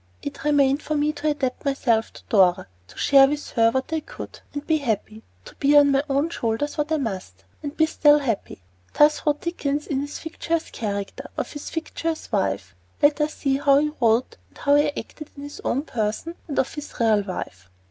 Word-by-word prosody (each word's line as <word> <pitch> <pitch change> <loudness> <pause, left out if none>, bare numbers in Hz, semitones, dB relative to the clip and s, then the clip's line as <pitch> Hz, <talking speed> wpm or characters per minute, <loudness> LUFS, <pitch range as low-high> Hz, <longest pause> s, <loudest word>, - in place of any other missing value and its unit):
It 285 -1 -6
remained 285 -1 +3
for 305 - -2
me 300 +1 +1
to 300 +1 -1
adapt 275 -4 -2
myself 240 -6 +1
to - - -13
Dora; 185 -4 +4 0.2
to - - -17
share 275 -1 +6
with 295 +1 -4
her 230 -1 +4
what 260 +6 -2
I 320 - +1
could, - - -10
and 290 0 -6
be 315 - +2
happy; 220 -4 -2 0.2
to - - -11
bear 290 +1 +6
on 285 -1 +3
my 275 0 +3
own 280 +4 +1
shoulders 230 +2 -2
what 300 0 -2
I 315 - +3
must, 185 - -5 0.2
and 290 +1 -6
be 315 - +5
still 295 -2 +5
happy. 230 - -3 0.3
Thus 300 +1 +5
wrote 295 0 +2
Dickens 300 -4 -2
in 275 -3 -1
his 285 +1 -5
fictitious 330 0 -3
character, 200 -3 -4
and - - -8
of - - -3
his 295 - -7
fictitious 325 0 -4
wife. 95 -1 -1 0.3
Let 290 +1 +4
us 300 +1 0
see 270 -2 0
how 275 0 +4
he 300 +1 +1
wrote 230 +2 +2
and - - -21
how 285 - +2
he 290 0 +5
acted 305 -1 -8
in 280 - -8
his 290 0 -8
own 275 - 0
person, 225 +5 -3
and 290 - -5
of 265 - +1
his 295 0 -7
real 220 -3 +4
wife. 95 - -7
280 Hz, 210 wpm, -24 LUFS, 230-295 Hz, 0.3 s, share